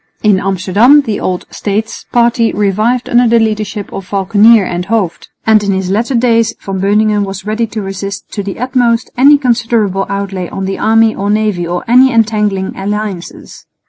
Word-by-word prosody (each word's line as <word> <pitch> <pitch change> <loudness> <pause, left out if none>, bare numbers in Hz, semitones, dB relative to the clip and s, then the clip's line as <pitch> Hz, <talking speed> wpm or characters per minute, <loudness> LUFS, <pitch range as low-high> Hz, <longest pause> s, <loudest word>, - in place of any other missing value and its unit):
In 205 -3 +3
Amsterdam 195 +9 +3
the 220 -7 -3
old 180 -1 -3
"States" 215 +2 -4
party 235 -1 +2
revived 215 +5 0
under 240 0 +3
the 235 +1 +3
leadership 215 -2 -3
of 195 -1 -7
Valckenier 205 +3 +4
and 180 +1 -4
Hooft; 205 -6 -2 0.2
and 220 -1 +4
in 200 -1 0
his 190 -1 -2
latter 235 +6 -1
days 230 -1 +1
Van 195 -1 -5
Beuningen 210 +1 +2
was 195 -1 -6
ready 220 +2 -1
to 215 -1 -5
resist 195 +1 -6
to 205 - -4
the 195 -1 -6
utmost 245 -1 0
any 280 +4 +5
considerable 230 -7 0
outlay 195 -2 -4
on 195 - -5
the 195 0 -4
army 225 0 +3
or 200 +1 -3
navy 210 -5 0
or 175 +1 -3
any 255 +3 +5
entangling 210 -4 0
alliances. 200 -2 -6
210 Hz, 175 wpm, -12 LUFS, 195-230 Hz, 0.2 s, any